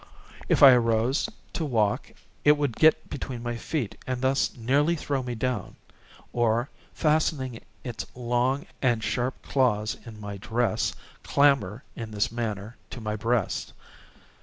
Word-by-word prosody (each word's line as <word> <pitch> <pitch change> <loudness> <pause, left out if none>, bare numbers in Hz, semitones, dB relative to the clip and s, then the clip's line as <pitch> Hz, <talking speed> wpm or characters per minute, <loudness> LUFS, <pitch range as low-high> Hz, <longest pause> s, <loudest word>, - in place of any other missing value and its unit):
If - - +4
I 135 - +12
arose 120 - +2 0.2
to 165 - -2
walk 110 -8 0 0.3
it 145 - +7
would 145 -6 -1
get 160 0 +4
between 125 -3 -5
my 120 0 -2
feet 120 -2 -3
and 130 -1 -1
thus 130 +1 +1
nearly 140 +8 +2
throw 140 -3 -2
me 125 -1 -4
down, 125 +2 -2 0.6
or, 120 +2 +1 0.2
fastening 150 -6 +1 0.2
its 120 -4 -5
long 125 +3 0 0.2
and 120 -4 +2
sharp 125 +4 -1
claws 110 -6 +1
in 110 -2 -10
my 100 -1 -6
dress, 115 +2 0 0.3
clamber, 135 -6 +2
in 115 -1 -6
this 105 0 0
manner, 110 -1 -4
to - - -7
my 110 -1 -3
breast. 115 -1 -1
120 Hz, 140 wpm, -27 LUFS, 110-135 Hz, 0.6 s, I